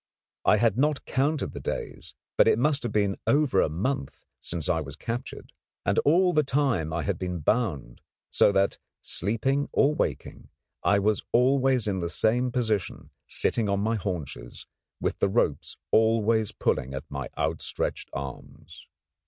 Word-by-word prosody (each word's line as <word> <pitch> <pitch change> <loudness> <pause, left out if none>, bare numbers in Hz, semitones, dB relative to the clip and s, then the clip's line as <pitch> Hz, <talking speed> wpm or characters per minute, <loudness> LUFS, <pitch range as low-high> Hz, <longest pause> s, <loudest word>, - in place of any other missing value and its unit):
I 105 - +5
had 115 +2 +2
not 150 0 +1
counted 140 +2 0
the - - -6
days, - - -6 0.2
but - - +5
it - - +4
must 145 +3 +1
have 120 - -3
been 100 -2 +1
over 140 -9 +3
a - - +1
month 90 - -3
since 85 -3 -5
I 80 - +1
was 70 -1 -8
captured, 115 +9 -6 0.3
and - - +2
all 180 +4 +4
that 150 -3 +2
time 130 - +1
I 80 +1 -2
had 100 -4 -2
been 90 -1 -3
bound 80 - -1 0.3
so - - +5
that, 100 0 +1 0.2
sleeping 130 +9 0
or 145 +2 +3
waking, - - -3 0.3
I 100 - +4
was 105 +1 +1
always 130 -1 +3
in 95 -2 0
the 85 -1 -2
same 120 +7 +1
position, 110 -6 -2 0.2
sitting 110 -3 0
on 100 0 +1
my 110 +2 +1
haunches, 80 - -5 0.3
with - - -2
the - - +2
ropes - - 0
always 110 -1 +3
pulling 65 +1 -1
at 70 - -5
my 70 -2 -5
outstretched - - -2
arms. 70 +3 -9
110 Hz, 160 wpm, -27 LUFS, 85-130 Hz, 0.3 s, I